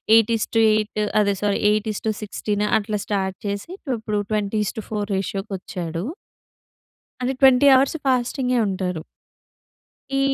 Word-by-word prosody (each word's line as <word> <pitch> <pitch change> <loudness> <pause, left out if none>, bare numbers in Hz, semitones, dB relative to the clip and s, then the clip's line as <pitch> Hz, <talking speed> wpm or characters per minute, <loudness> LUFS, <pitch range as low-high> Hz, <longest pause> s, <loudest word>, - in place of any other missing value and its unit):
8:8 220 -1 +2 0.2
అదే 200 -1 +2
సారీ. 205 -1 +1
8:16 210 -1 -2
అట్లా 210 0 -3
స్టార్ట్ 190 -2 -1
చేసి 200 +7 -4 0.3
ఇప్పుడు 215 -1 -2
20:4 210 0 -2
రేషియోకి 195 +1 -3
వచ్చాడు. 175 -2 -5 1.2
అంటే 255 +1 0
20 265 +1 +6
అవర్స్ 275 +4 +3
ఫాస్టింగే 255 0 +1
ఉంటారు. 185 -3 -2 1.1
ఈ 275 - +2
210 Hz, 100 wpm, -22 LUFS, 200-225 Hz, 1.2 s, 20